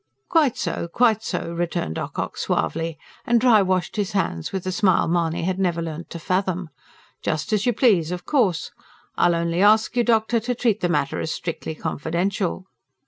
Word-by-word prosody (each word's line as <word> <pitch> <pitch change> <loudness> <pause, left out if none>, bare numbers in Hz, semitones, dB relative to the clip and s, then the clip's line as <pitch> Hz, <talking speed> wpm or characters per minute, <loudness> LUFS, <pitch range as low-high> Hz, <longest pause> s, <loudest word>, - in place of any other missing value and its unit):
"Quite 300 -7 +3
so, - - -2
quite 220 +3 +2
so!" 170 - -3
returned 170 - -2
Ocock - - -4
suavely, 165 0 -1 0.3
and 235 0 +3
dry 230 -3 +5
washed 185 +1 0
his 200 -2 -1
hands 85 - -1
with 190 -2 -3
the 185 - -2
smile 185 -3 +3
Mahony 165 -1 0
had 185 +2 -1
never 175 -3 +1
learnt 165 0 -5
to - - -6
fathom. 185 0 -1 0.5
"Just 155 +4 -2
as 210 +2 +1
you 245 - +3
please, 200 - +3
of 180 0 -5
course. 215 - +1 0.4
I'll 175 -1 +3
only 170 +1 0
ask 215 +3 +4
you, 240 - +3
doctor, 230 0 +2
to 245 +3 -2
treat 225 -3 +1
the 175 - 0
matter 145 -4 0
as - - -3
strictly 165 -1 -4
confidential." 180 +5 -2
185 Hz, 180 wpm, -23 LUFS, 170-215 Hz, 0.5 s, dry